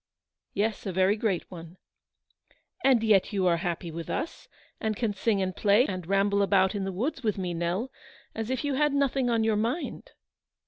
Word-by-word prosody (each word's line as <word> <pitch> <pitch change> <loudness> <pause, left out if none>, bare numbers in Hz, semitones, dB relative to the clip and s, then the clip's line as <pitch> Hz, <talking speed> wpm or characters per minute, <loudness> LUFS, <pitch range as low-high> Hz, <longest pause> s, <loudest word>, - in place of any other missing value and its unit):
" - - -63
Yes, 210 0 -1
a - - -1
very 190 +3 +3
great 210 -5 -2
one." 170 0 -10 1.1
"And 255 -4 +4
yet 210 -4 +3
you 195 -3 0
are 170 -2 +3
happy 170 -1 -3
with 165 +1 -7
us, 325 - -4 0.3
and 220 -1 -1
can 220 -1 -1
sing 200 0 +1
and 185 -1 -3
play, 210 +4 +4
and 185 - -5
ramble 200 +1 +2
about 190 -1 +3
in 200 -2 -2
the 195 - -2
wo 230 - -1
with 215 -3 0
me, 180 -2 -2
Nell, 175 +9 -2 0.4
as 225 +1 -4
if 260 0 -1
you 290 -1 0
had 295 +1 +2
nothing 270 -2 +1
on 230 -2 +2
\ - - +1
mind." 305 - -3
200 Hz, 195 wpm, -28 LUFS, 185-230 Hz, 1.1 s, And